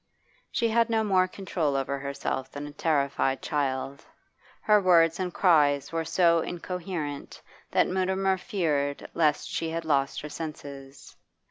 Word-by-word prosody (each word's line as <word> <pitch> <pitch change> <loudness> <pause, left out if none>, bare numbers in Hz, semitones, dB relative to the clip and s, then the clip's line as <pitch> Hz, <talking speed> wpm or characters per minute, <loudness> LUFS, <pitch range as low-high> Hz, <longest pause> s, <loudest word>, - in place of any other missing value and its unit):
She 230 - +1
had 230 +1 +2
no 225 -1 +2
more 185 -3 +3
control 170 -6 -2
over 135 +1 -1
herself 140 -1 -4
than 145 0 -6
a 145 - -8
terrified 140 -3 0
child; 140 -2 -2 0.6
her 210 -1 +4
words 165 -2 +4
and 185 -1 -2
cries 145 -6 +3
were 165 -1 -2
so 170 -1 +3
incoherent 170 -4 -5 0.3
that - - +3
Mutimer 190 +1 0
feared 145 -8 -1
lest 155 -3 +1
she 165 - -3
had 165 0 -4
lost 140 -3 +1
her 150 - -7
senses. 140 -3 -8
160 Hz, 140 wpm, -27 LUFS, 140-185 Hz, 0.6 s, her